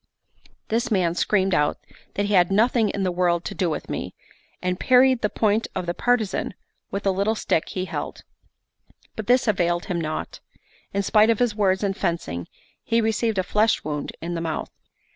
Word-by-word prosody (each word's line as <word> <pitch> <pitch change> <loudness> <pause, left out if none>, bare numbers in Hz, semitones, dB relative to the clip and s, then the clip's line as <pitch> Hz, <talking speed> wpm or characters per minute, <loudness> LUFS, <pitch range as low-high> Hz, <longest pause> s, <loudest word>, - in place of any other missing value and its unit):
This 230 +2 0
man 185 -6 +2
screamed 190 +1 +1
out 150 -2 +2 0.4
that 205 - 0
he 205 - -1
had 180 -1 +4
nothing 225 +1 +3
in 195 - -2
the 185 - +1
world 175 -1 +1
to - - -4
do 185 -4 0
with 155 - -4
me, - - -5 0.4
and 180 0 -2
parried 255 -1 +5
the 210 - +1
point 215 +1 +1
of 185 - -2
the 175 - -1
partisan 245 -1 0 0.3
with 200 +1 -4
a 195 - +4
little 200 +4 0
stick 165 - 0
he 185 -1 -3
held; - - -5 0.9
but 220 - -6
this 250 0 +4
availed 175 -4 +1
him 180 -4 -2
naught: 155 -1 -4 0.5
in 200 0 -1
spite 215 +2 +4
of 230 - +3
his 245 -2 +1
words 195 -2 +1
and 195 -1 0
fencing, 125 - -2 0.4
he 230 - +1
received 225 -1 0
a 185 - +2
flesh 215 +3 +2
wound 150 -1 -3
in 175 +1 -3
the 165 - -3
mouth. 160 -1 -3
195 Hz, 190 wpm, -24 LUFS, 175-220 Hz, 0.9 s, parried